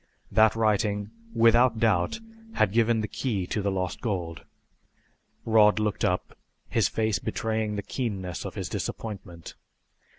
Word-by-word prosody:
That 110 +2 +5
writing, 105 -2 +1 0.2
without 115 +1 +5
doubt, 105 - +2 0.3
had 110 - +2
given 115 0 +2
the 105 - -2
key 105 -8 -2
to 105 - -2
the 100 - 0
lost 95 -2 -3
gold. 90 -7 -3 1.0
Rod 110 -2 +5
looked 105 -2 -1
up, 90 0 -1 0.3
his - - +2
face 110 -4 0
betraying 110 -1 -2
the 100 - -3
keenness 95 -9 -4
of - - -7
his - - -3
disappointment. 90 -7 -6
105 Hz, 135 wpm, -27 LUFS, 95-110 Hz, 1.0 s, That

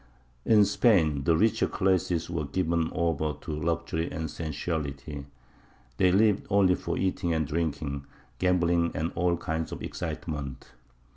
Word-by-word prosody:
In 105 -2 +6
Spain 80 - +3
the 80 -1 +4
richer 110 +4 +3
classes 90 -4 +1
were 80 -3 -2
given 85 +2 0
over 80 -2 0
to 85 - -6
luxury 80 +1 -2
and 80 -2 -4
sensuality; 75 -3 -4 0.7
they 90 - +4
lived 105 +1 +3
only 100 -2 +4
for - - -3
eating 90 -2 0
and 80 -1 +1
drinking, 75 -3 -2 0.3
gambling 85 -2 +2
and 80 +2 -1
all 85 0 +1
kinds 80 0 -3
of - - -6
excitement. 70 -4 -5
85 Hz, 135 wpm, -28 LUFS, 75-90 Hz, 0.7 s, In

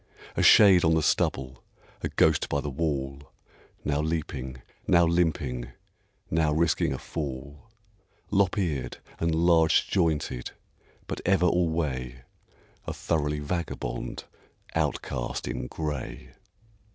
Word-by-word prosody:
A - - +1
shade 95 -4 +7
on 80 0 +4
the 80 - +1
stubble, 65 -3 0 0.4
a - - -2
ghost - - +2
by 70 - 0
the 70 0 -4
wall, 70 -2 -2 0.6
Now 75 0 +1
leaping, 70 -5 -4 0.2
now 85 -1 +5
limping, 80 -8 0 0.6
now 80 -1 +2
risking 80 -1 +2
a 65 - -2
fall, 70 +6 -6 0.6
Lop 100 -1 +2
eared 75 -11 -2 0.2
and 85 -1 +1
large 80 -1 +4
jointed, 80 -8 0 0.6
but - - -5
ever 95 -1 +3
alway 75 -9 0 0.6
A - - -2
thoroughly 75 -2 -1
vagabond 75 -5 -4 0.5
outcast - - -2
in - - -3
gray. 75 -3 -5
75 Hz, 115 wpm, -27 LUFS, 65-85 Hz, 0.6 s, shade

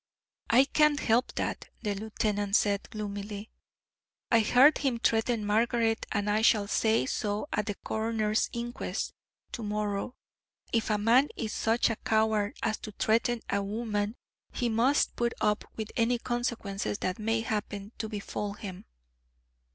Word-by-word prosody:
"I 255 +4 +6
can't 300 +1 +3
help 240 0 +1
that," - - -3
the 210 -2 0
lieutenant 205 -1 -1
said, 205 -2 +1
gloomily. 205 0 -6 0.8
"I 230 - +6
heard 250 +7 +6
him 265 -4 0
threaten 225 -1 +1
Margaret, 225 +1 +1
and 205 -1 0
I 210 +1 +2
shall 215 -2 +4
say 220 - +2
so 205 - -2
at 210 - 0
the 205 - -2
coroner's 220 0 0
inquest 240 +1 -4 0.4
to - - -5
morrow. 210 +2 -2 0.6
If 225 -1 +1
a 210 - +2
man 235 +7 +4
is 220 -3 -3
such 230 +1 +2
a 225 - -3
coward 220 -1 +1
as 215 - 0
to 215 - -7
threaten 230 +2 +1
a 200 - 0
woman 210 +1 -2 0.4
he 245 - -1
must 240 +6 +2
put 235 0 0
up 210 0 +1
with 220 -1 -5
any 240 +1 +2
consequences 235 -5 -2
that 185 +2 -2
may 225 +1 0
happen 210 -2 -3
to 220 - -3
befall 205 -1 -4
him." 195 -3 -8
220 Hz, 150 wpm, -29 LUFS, 205-235 Hz, 0.8 s, I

